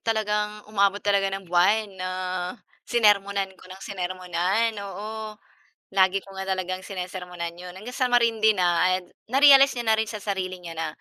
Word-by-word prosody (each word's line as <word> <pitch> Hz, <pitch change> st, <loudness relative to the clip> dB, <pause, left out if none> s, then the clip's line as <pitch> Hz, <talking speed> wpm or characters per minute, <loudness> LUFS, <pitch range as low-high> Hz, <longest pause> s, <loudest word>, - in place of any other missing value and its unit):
talagang 210 Hz, -1 st, -1 dB
umabot 200 Hz, -1 st, +2 dB
talaga 200 Hz, -1 st, +2 dB
ng 195 Hz, 0 st, -5 dB
buwan 195 Hz, +4 st, +2 dB
na 185 Hz, -1 st, -5 dB, 0.8 s
sinermonan 200 Hz, -4 st, +2 dB
ko 185 Hz, -, -17 dB
nang 190 Hz, +1 st, -10 dB
sinermonan. 185 Hz, +3 st, -1 dB
Oo, 215 Hz, +2 st, -6 dB, 0.5 s
lagi 190 Hz, 0 st, +3 dB
ko 195 Hz, -, -16 dB
nga 190 Hz, -, -4 dB
talagang 185 Hz, -1 st, -3 dB
sinesermonan 180 Hz, -2 st, -5 dB
'yon 180 Hz, 0 st, -9 dB
hanggang 215 Hz, +6 st, -8 dB
sa 255 Hz, 0 st, 0 dB
marindi 230 Hz, -3 st, +3 dB
na, 180 Hz, -2 st, +2 dB
and 185 Hz, -1 st, -5 dB, 0.2 s
na-realize 275 Hz, +2 st, +7 dB
niya 240 Hz, -2 st, -1 dB
na 220 Hz, -, +5 dB
rin 220 Hz, -, +1 dB
sa 210 Hz, 0 st, -7 dB
sarili 185 Hz, -2 st, -3 dB
niya 165 Hz, -2 st, -8 dB
na 165 Hz, -, -1 dB
195 Hz, 165 wpm, -25 LUFS, 185-215 Hz, 0.8 s, na-realize